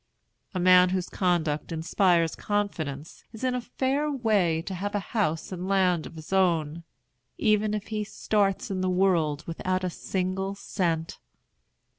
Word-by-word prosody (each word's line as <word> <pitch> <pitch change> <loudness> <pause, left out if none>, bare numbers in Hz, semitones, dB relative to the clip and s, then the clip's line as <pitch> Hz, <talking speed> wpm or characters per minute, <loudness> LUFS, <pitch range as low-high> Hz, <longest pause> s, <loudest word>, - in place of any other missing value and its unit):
A - - 0
man 180 0 +6
whose 185 -1 -2
conduct 170 -5 0
inspires 165 0 +2
confidence 160 -8 -3
is 220 - -9
in 255 -1 +1
a 250 - -1
fair 270 +5 -1
way 205 - +1
to 190 - -5
have 200 +3 -3
house 200 -6 -1
and 185 0 -4
land 185 -4 +2
of - - -13
his 160 +3 -8
own, 170 -4 +1 0.5
even 215 -1 +2
if 210 0 -5
he 215 -1 -2
starts 205 -2 0
in 185 -1 -2
the 185 - +1
world 170 -5 +2
without 185 +2 -2
a 180 - -1
single 190 +2 -2
cent. 170 -5 -2
185 Hz, 150 wpm, -27 LUFS, 165-205 Hz, 0.5 s, man